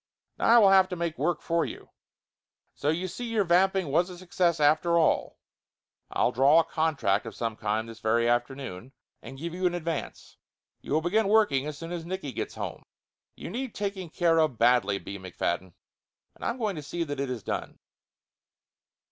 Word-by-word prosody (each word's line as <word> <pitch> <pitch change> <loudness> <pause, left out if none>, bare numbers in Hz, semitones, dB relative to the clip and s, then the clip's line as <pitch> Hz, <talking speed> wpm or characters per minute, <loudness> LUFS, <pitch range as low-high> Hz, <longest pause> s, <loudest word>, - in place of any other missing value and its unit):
"Now - - 0
I 235 - +7
will 200 -4 +7
have 190 -1 +6
to 180 - -3
make 170 -4 -3
work 160 +3 0
for 170 0 +1
you! - - -8 0.8
So 145 - -2
you 175 +4 0
see 190 +8 -6
your 225 -3 +1
vamping 185 -1 +2
was 170 +6 +2
a 180 - -9
success 175 -2 0
after 155 +3 +3
all. 160 - +1 0.7
I'll - - +1
draw 140 +6 +5
a - - +4
contract 150 -13 0
of - - -8
some 115 -2 -3
kind 110 +1 -2
this 115 -1 -10
very 115 +2 +2
afternoon, 120 -1 -2 0.3
and 135 - -10
give 165 +4 -5
you 180 +1 +1
an 175 - -1
advance. 165 -3 -5 0.4
You - - -5
will 155 - +3
begin 200 +6 +1
working 205 -10 +3
as 150 -1 -5
soon 165 +2 -7
as 175 -2 -4
Nicky 175 -4 -5
gets - - -5
home. - - -5 0.5
You - - -8
need 250 +2 -4
taking 195 -4 -4
care 165 0 +2
of 155 -7 +1
badly, 115 -4 +3
B. 100 0 -8
McFadden, 90 -1 -3 0.6
and - - -14
I'm 235 - -1
going 210 -7 -2
to - - -4
see 170 +4 -3
that 145 -3 -5
it 140 -1 -2
is 120 -5 -4
done." - - -4
160 Hz, 190 wpm, -27 LUFS, 130-180 Hz, 0.8 s, I